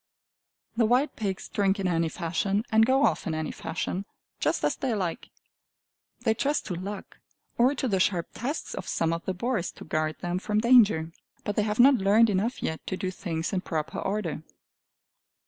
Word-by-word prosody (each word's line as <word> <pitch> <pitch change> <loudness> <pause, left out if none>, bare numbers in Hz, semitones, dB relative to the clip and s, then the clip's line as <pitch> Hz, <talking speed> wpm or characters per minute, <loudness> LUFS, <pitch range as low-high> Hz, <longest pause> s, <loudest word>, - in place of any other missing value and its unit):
The 230 -2 +4
wild 255 +6 +2
pigs 195 -4 -3
drink 200 0 +1
in 190 - 0
any 165 -2 +1
fashion, 195 +6 -1
and 220 0 +5
go 270 +2 +4
off - - 0
in 160 - -1
any 155 0 -2
fashion 185 +3 -4 0.3
just - - 0
as - - +2
they 255 -4 -1
like. 180 -5 -3 0.9
They 225 -3 +2
trust 285 +6 0
to 190 - -3
luck 195 +3 -7 0.4
or 255 +4 +4
to 265 - -1
the 195 -5 +1
sharp 180 -2 +1
tusks 275 +7 -4
of - - -6
some 165 0 0
of 165 - -4
the 190 - -2
boars 225 -2 -1
to - - -11
guard 155 0 -1
them 175 +1 -1
from 210 +2 0
danger. 215 -9 +5 0.3
But 205 - -2
they - - +3
have 210 +1 -2
not 265 +2 +7
learned 210 +3 +5
enough 205 +6 -1
yet 160 - -2
to 185 - -2
do 185 -1 -2
things 165 -1 -3
in 185 - 0
proper 160 -4 -3
order. 195 -7 -2
195 Hz, 190 wpm, -27 LUFS, 175-225 Hz, 0.9 s, not